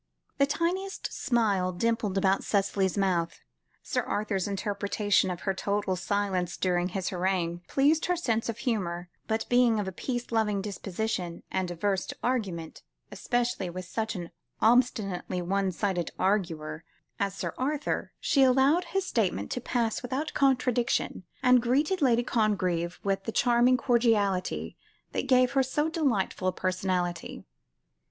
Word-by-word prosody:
The 280 - +5
tiniest 355 +6 -2
smile 210 -8 +1
dimpled 210 0 0
about 195 0 +2
Cicely's 195 -1 +1
mouth. 180 -4 0 0.4
Sir - - 0
Arthur's 205 -3 -1
interpretation 200 0 0
of 180 -1 -4
her 195 - 0
total 200 0 -1
silence 190 -1 -1
during 180 -1 +1
his 190 0 -2
harangue, 175 -2 -1
pleased 300 +4 +2
her 360 - +2
sense 230 -10 -1
of 230 - -3
humour, 180 -8 -2 0.2
but, 220 0 0
being 245 -3 +4
of 205 - -2
a - - -2
peace 240 +6 -4
loving 215 -3 +1
disposition, 195 -2 -3
and 190 -1 -1
averse 190 +2 -1
to - - -7
argument, 195 -10 -2 0.3
especially 240 -6 -1
with 185 +1 -6
such 220 +4 -3
an 175 -2 -6 0.3
obstinately 220 -6 +2
one 190 +2 0
sided 180 -2 -1
arguer 165 -6 -1 0.4
as 200 -1 -1
Sir - - -4
Arthur, 290 +3 -1
she 275 - +2
allowed 270 +6 +4
his 390 -1 -1
statement 195 - -1
to 250 - -2
pass 235 -2 -1
without 265 +5 -3
contradiction, 250 -7 +1 0.2
and 250 -1 +6
greeted 290 +10 +1
Lady 240 -3 +4
Congreve 185 -7 0
with 195 -1 -1
the 225 - -2
charming 245 +2 +4
cordiality, 225 -7 +1 0.4
that - - -2
gave 255 -2 +4
her 270 - +3
so 295 +4 0
delightful 250 - 0
a - - +3
personality. 185 -1 -2
205 Hz, 145 wpm, -28 LUFS, 185-245 Hz, 0.4 s, and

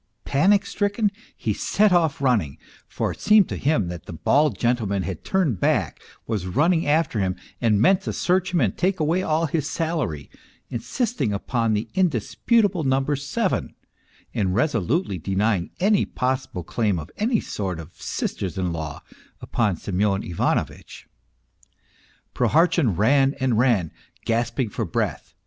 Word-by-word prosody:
Panic 195 +8 +3
stricken 205 +1 0 0.3
he 110 - -1
set 205 - +2
off 160 -5 +2
running, 105 - +1 0.3
for - - -2
it - - -10
seemed 210 -3 +5
to - - -4
him 130 - +1
that 85 -1 -8
the - - -7
bald 145 - +2
gentleman 110 -6 0
had 90 -4 -5
turned 165 - 0
back, - - 0 0.2
was 105 -5 -2
running 160 - +2
after 150 -6 +1
him, 95 -2 0 0.3
and 110 -4 +3
meant 185 - +4
to - - -3
search 185 +1 0
him 175 - +1
and 105 -6 +1
take 185 0 0
away 160 +4 +1
all 160 -2 +1
his 155 -2 -1
salary, 150 - -2 0.4
insist 235 - -2
ing 110 - +1
upon 115 +2 0
the 105 +3 -2
indisputable 190 +1 +1
number 135 +2 +1
seven, 140 +1 -2 0.6
and 95 -3 0
resolutely 120 - 0
denying 95 +1 0
any 205 +1 +3
possible 130 -7 -2
claim 105 +1 0
of 75 -2 -7
any 225 +1 +1
sort 95 -5 -4
of 80 +1 -10
sisters 95 -4 -3
in 90 -2 -1
law 80 -3 -6 0.4
upon 105 -6 0
Semyon 100 +2 0
Ivano 85 - +1
vitch. - - -14 1.3
Prohartchin 165 - +2
ran 135 +6 +3
and 130 -3 +1
ran, 115 -10 +2 0.3
gasping 115 +1 0
for - - -2
breath. - - -3
125 Hz, 150 wpm, -23 LUFS, 100-165 Hz, 1.3 s, seemed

